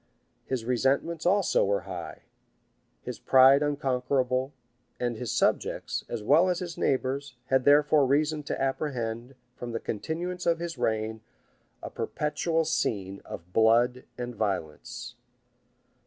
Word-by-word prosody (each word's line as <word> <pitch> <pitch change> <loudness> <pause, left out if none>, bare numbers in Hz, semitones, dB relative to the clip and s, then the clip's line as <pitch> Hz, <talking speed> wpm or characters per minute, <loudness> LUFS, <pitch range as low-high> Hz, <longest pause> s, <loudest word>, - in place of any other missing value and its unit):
His 125 -4 -2
resentments 135 +7 0
also 195 +1 +3
were 100 0 +1
high; - - -8 0.8
his - - -6
pride 135 +2 +6
unconquerable; 130 -2 0 0.5
and 120 -1 -1
his 115 0 -4
subjects, - - 0
as 115 -3 -4
well 160 - +5
as 180 - +1
his 175 -2 -5
neighbors, 135 0 -1
had 130 -1 +2
therefore 145 0 +5
reason 150 +3 +1
to - - -3
apprehend, 130 -3 -2 0.2
from 120 -1 -6
the 115 - -2
continuance 170 - -4
of 170 -1 +3
his 170 0 -5
reign, 110 0 -1 0.6
a - - -6
perpetual 160 +2 -1
scene 100 -10 -1
of 85 +2 -9
blood 120 +3 +3
and 125 0 -4
violence. 95 -8 -4
130 Hz, 125 wpm, -28 LUFS, 115-150 Hz, 0.8 s, pride